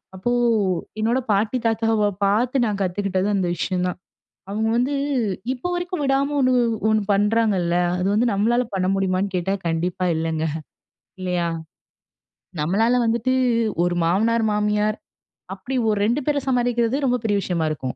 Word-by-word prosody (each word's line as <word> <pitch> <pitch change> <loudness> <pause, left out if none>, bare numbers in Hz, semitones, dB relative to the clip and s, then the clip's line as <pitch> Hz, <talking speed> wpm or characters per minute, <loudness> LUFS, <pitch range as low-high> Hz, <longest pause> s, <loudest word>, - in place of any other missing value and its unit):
அப்போ 190 +6 -2 0.7
என்னோட 230 +4 +1
பாட்டி, 210 +5 +1
தாத்தாவ 225 -2 +2 0.2
பார்த்து 240 +6 +2
நான் 210 -3 -2
கத்துக்கிட்டது 190 0 -1
அந்த 190 -2 0
விஷயம் 180 +1 -1
தான். 180 - -4 0.5
அவங்க 220 +2 -1
வந்து 255 +4 +1 0.6
இப்போ 260 +7 -4
வரைக்கும் 355 -2 -3
விடாம 275 +1 +1
ஒண்ணு 255 -2 +3 0.2
வ் 225 - -1
ஒண்ணு 215 -1 +2
பண்றாங்கள்ல. 205 -4 +2 0.2
அது 180 - -1
வந்து 230 +4 +2
நம்மளால 235 +5 +2
பண்ண 185 -1 0
முடியுமான்னு 190 0 -1
கேட்டா, 185 +2 0
கண்டிப்பா 170 +2 -1
இல்லைங்க. 160 0 -1 0.8
இல்லையா? 180 -2 -1 1.1
நம்மளால 220 +10 +2
வந்துட்டு 235 +2 +1 0.5
ஒரு 175 0 0
மாமனார், 220 +7 +2
மாமியார் 210 +1 0 0.6
அப்படி 200 +8 -6
ஒரு 210 - +1
2 240 +7 +1
பேர 295 -1 +1
சமாளிக்கிறதே 245 0 +1
ரொம்ப 250 -1 +2
பெரிய 205 -2 +1
விஷயமா 170 -4 -1
இருக்கும். 130 -4 -4
210 Hz, 140 wpm, -22 LUFS, 185-240 Hz, 1.1 s, ஒண்ணு